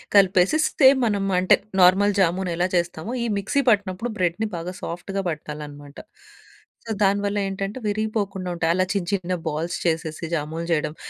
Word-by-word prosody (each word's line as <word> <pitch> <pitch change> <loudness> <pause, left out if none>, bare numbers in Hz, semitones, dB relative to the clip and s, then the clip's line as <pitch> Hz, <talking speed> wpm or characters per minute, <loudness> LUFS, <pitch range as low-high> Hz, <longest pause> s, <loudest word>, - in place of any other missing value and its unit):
కలిపేసిస్తే 200 - +4 0.2
మనం 205 -3 0 0.2
అంటే 185 - +5 0.3
నార్మల్ 195 +3 +5
జామూనెలా 180 -1 +1
చేస్తామో, 175 +5 -2
ఈ - - -1
మిక్సీ 210 +8 0
పట్టినప్పుడు 205 +1 0
బ్రెడ్‌ని 180 +4 0
బాగా 170 +2 -5
సాఫ్ట్‌గా 195 +3 -4
బట్టాలనమాట. 150 -2 -8 0.9
సో, 225 - -5
దానివల్లేంటంటే, 200 +1 -1
విరిగిపోకుండుంటాయి. 195 -5 -1
అలా 185 0 +2
చిన్న 195 -4 -2
చిన్న 185 -2 -1
బాల్స్ 160 +3 -2
చేసేసి 165 -1 -1
జామూలు 160 +2 -4
చేయడం. 155 -1 -1
185 Hz, 125 wpm, -23 LUFS, 170-200 Hz, 0.9 s, అంటే